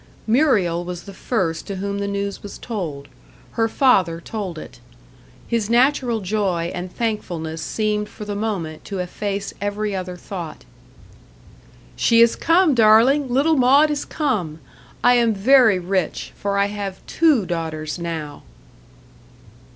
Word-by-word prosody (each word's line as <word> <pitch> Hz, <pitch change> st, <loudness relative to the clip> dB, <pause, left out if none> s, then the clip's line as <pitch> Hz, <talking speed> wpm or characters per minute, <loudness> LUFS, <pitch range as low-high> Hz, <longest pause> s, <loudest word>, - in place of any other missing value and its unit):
Muriel 215 Hz, -, +2 dB
was 175 Hz, 0 st, -6 dB
the 200 Hz, -, -10 dB
first 185 Hz, -6 st, -2 dB
to 200 Hz, -, -4 dB
whom 200 Hz, +1 st, -3 dB
the 200 Hz, -, -2 dB
news 200 Hz, 0 st, -3 dB
was 205 Hz, -, -9 dB
told. 160 Hz, -, -5 dB, 0.4 s
Her 225 Hz, -1 st, +1 dB
father 190 Hz, -, +2 dB
told 190 Hz, -2 st, -5 dB
it. 155 Hz, -, -10 dB, 0.7 s
His 230 Hz, -3 st, -1 dB
natural 245 Hz, -1 st, +2 dB
joy 185 Hz, -4 st, -1 dB
and 180 Hz, 0 st, -5 dB
thankfulness 175 Hz, -9 st, -3 dB
seemed 210 Hz, +4 st, -1 dB
for 210 Hz, -, -9 dB
the 205 Hz, -, -4 dB
moment 195 Hz, -7 st, -3 dB
to 200 Hz, -, -5 dB
efface 195 Hz, +2 st, -4 dB
every 205 Hz, 0 st, -2 dB
other 180 Hz, -1 st, -5 dB
thought. 175 Hz, -3 st, -8 dB, 1.3 s
"She 230 Hz, -1 st, +3 dB
is 230 Hz, 0 st, +5 dB
come, 330 Hz, -1 st, +3 dB
darling! 240 Hz, +5 st, +5 dB
little 290 Hz, +5 st, +3 dB
Maud 275 Hz, +4 st, +5 dB
is 290 Hz, -, -2 dB
come. 195 Hz, -, -2 dB, 0.4 s
I 245 Hz, -, +6 dB
am 235 Hz, -3 st, +3 dB
very 225 Hz, 0 st, +5 dB
rich 180 Hz, -1 st, -2 dB
for 200 Hz, 0 st, -2 dB
I 200 Hz, -, +3 dB
have 200 Hz, -2 st, -6 dB
two 305 Hz, -, +3 dB
daughters 160 Hz, -2 st, -4 dB
now." 160 Hz, -4 st, -5 dB
200 Hz, 140 wpm, -21 LUFS, 180-235 Hz, 1.3 s, I